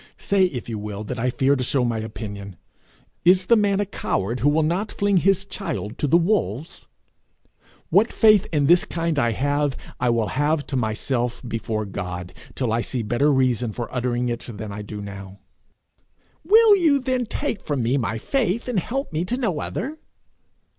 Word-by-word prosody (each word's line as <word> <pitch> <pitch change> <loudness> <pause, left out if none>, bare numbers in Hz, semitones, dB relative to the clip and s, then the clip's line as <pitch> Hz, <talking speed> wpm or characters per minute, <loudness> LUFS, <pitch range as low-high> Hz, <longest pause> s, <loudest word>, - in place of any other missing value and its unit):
Say 195 -1 +2
if 135 -10 -4
you 110 -3 -4
will 105 0 -5
that 125 +3 -5
I 125 +2 +1
fear 135 +3 +2
to 130 - -1
show 125 0 +1
my 115 -2 -1
opinion. 100 -3 -7 0.7
Is 185 +1 +5
the 235 - +5
man 205 -2 +2
a 205 - +1
coward 120 - -2
who 145 - +3
will 155 +2 +2
not 180 +7 -1
fling 200 -1 +1
his 195 +1 +2
child 165 - -5
to 150 - +1
the 165 - +5
wolves? 165 - -1 1.0
What 200 +7 +4
faith 215 -3 +5
in 150 -3 +2
this 175 +4 +5
kind 165 -3 -1
I 120 -3 +2
have, 145 +2 0 0.2
I 125 - +1
will 115 -3 +1
have 145 +1 0
to 135 - -4
myself 120 +1 -1
before 110 -2 -3
God, 90 -2 -6 0.2
till 120 -4 -1
I 115 - +1
see 120 0 -3
better 120 +7 +2
reason 125 -4 +1
for 120 +2 -6
uttering 125 -1 -1
it 120 -1 -4
than 105 -1 -7
I 105 +1 -6
do 105 0 -7
now. 100 -1 -9 1.1
'Will 430 +4 +7
you 315 -6 +3
then 255 -2 -1
take 255 -4 -3
from 140 -5 -2
me 120 +4 +1
my 115 -4 -1
faith, 230 - -1
and 240 -6 +1
help 265 - -4
me 155 +2 0
to 245 +7 -2
no 205 - -1
other?' 305 +6 -4
135 Hz, 190 wpm, -23 LUFS, -, 1.1 s, Will